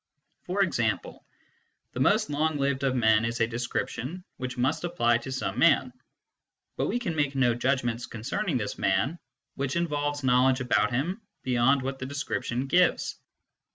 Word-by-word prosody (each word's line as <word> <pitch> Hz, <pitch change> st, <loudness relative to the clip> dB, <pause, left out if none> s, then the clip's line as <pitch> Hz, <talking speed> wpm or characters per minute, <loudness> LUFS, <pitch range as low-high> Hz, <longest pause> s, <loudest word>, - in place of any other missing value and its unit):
For -, -, +2 dB
example, -, -, -1 dB, 0.4 s
" -, -, -46 dB
the -, -, -5 dB
most 215 Hz, -4 st, +3 dB
long 155 Hz, +1 st, 0 dB
lived 140 Hz, -1 st, 0 dB
of 135 Hz, -2 st, +1 dB
men 110 Hz, -2 st, +4 dB
is 115 Hz, +1 st, -2 dB
a 115 Hz, -, +4 dB
description 120 Hz, +7 st, -4 dB
which 130 Hz, 0 st, -5 dB
must 145 Hz, +6 st, 0 dB
apply 120 Hz, -10 st, +2 dB
to 130 Hz, +3 st, -7 dB
some 120 Hz, -4 st, -3 dB
man, 140 Hz, -5 st, +4 dB, 0.8 s
but -, -, -1 dB
we 230 Hz, -, 0 dB
can 215 Hz, -10 st, -3 dB
make 145 Hz, -2 st, 0 dB
no 130 Hz, -3 st, +3 dB
judgments 120 Hz, -1 st, -1 dB
concerning 130 Hz, -, -2 dB
this 105 Hz, -4 st, -4 dB
man 135 Hz, -, +1 dB, 0.3 s
which 135 Hz, +1 st, -3 dB
involve 145 Hz, -4 st, -1 dB
knowledge 130 Hz, +1 st, +4 dB
about 115 Hz, -4 st, +2 dB
him 170 Hz, -, -1 dB, 0.2 s
beyond 130 Hz, +2 st, +3 dB
what 135 Hz, 0 st, -4 dB
the 130 Hz, -, -4 dB
description 135 Hz, -3 st, -2 dB
gives. 175 Hz, +6 st, +2 dB
130 Hz, 160 wpm, -27 LUFS, 120-145 Hz, 0.8 s, men